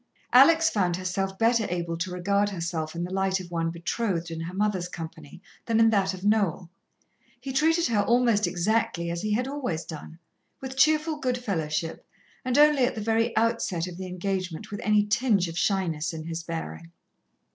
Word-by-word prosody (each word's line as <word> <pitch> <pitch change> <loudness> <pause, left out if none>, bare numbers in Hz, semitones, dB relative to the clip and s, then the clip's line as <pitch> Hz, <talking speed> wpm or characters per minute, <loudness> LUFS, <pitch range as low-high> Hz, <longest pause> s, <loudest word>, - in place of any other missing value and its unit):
Alex 320 +6 +7
found 180 -5 +1
herself 190 +1 -3
better 225 0 +2
able 170 -1 -2
to 170 +3 -3
regard 200 +3 0
herself 165 -4 -4
in 170 - -3
the 180 +1 -5
light 190 0 +1
of 175 -2 -10
one 165 -1 -1
betrothed 170 0 -2
in 165 - -5
her 170 +2 -6
mother's 195 -3 0
company 165 -3 -9 0.3
than 225 -1 +2
in 225 0 +5
that 195 -2 +2
of 185 0 -8
Noel. 195 -5 +1 0.7
He 265 +1 -6
treated 325 +4 +3
her 220 -4 +2
almost 230 -2 +3
exactly 175 -1 0
as 170 0 -3
he 215 0 -1
had 250 +4 0
always 260 - -3
done, 160 0 -9 0.4
with 265 0 -7
cheerful 310 +2 +3
good 250 -2 0
fellowship, 165 -8 -3 0.4
and 255 +1 0
only 295 -2 +6
at 250 - -2
the - - -4
very 225 +2 0
outset 225 -7 +1
of 180 -1 -8
the 190 0 -6
engagement 185 +1 -4
with 205 - -5
any 210 -1 +3
tinge 210 -3 +2
of 165 - -7
shyness 165 -5 0
in 160 -1 -6
his 165 0 -4
bearing. 85 - -6
195 Hz, 185 wpm, -26 LUFS, 170-230 Hz, 0.7 s, Alex